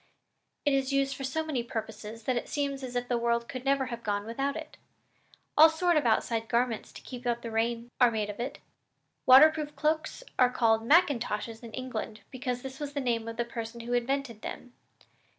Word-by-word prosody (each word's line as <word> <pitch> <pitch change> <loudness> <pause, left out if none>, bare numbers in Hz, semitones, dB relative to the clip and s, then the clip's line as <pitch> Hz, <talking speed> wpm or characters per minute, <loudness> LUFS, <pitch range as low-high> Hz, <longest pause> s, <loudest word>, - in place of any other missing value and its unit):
It 290 - +3
is 270 0 +1
used 275 0 +1
for 270 - -7
so 315 +5 -1
many 290 -6 -1
purposes 220 -1 -6
that 255 +3 0
it 240 - -3
seems 280 -2 -2
as 250 -2 -6
if 245 0 -1
the 245 -1 +1
world 235 0 +1
could 255 -1 -6
never 275 0 +2
have 235 - -6
gone 205 -2 -1
on - - -12
without 270 +5 -1
it. 315 -1 -7 0.8
All 315 +2 +9
sorts 330 0 +2
of 255 - -1
outside 225 0 +1
garments 235 -2 0
to - - -11
keep 250 -1 -7
out 235 0 0
the 230 - -5
rain 230 +1 -1
are 245 - +8
made 215 -2 -1
of 205 - -13
it. 245 +3 -3 0.7
Waterproof 295 +3 +7
cloaks 310 +9 -1 0.2
are 250 -1 +6
called 225 -3 +3
macintoshes 235 -7 +2
in 230 -2 -9
England 225 -4 -5
because 250 -2 -3
this 265 0 -7
was 290 -1 -5
the 285 - -1
name 235 -4 -1
of 230 0 -6
the 235 - 0
person 230 0 -6
who 240 +1 -4
invented 245 -2 -1
them. 245 - -7
245 Hz, 205 wpm, -29 LUFS, 230-275 Hz, 0.8 s, All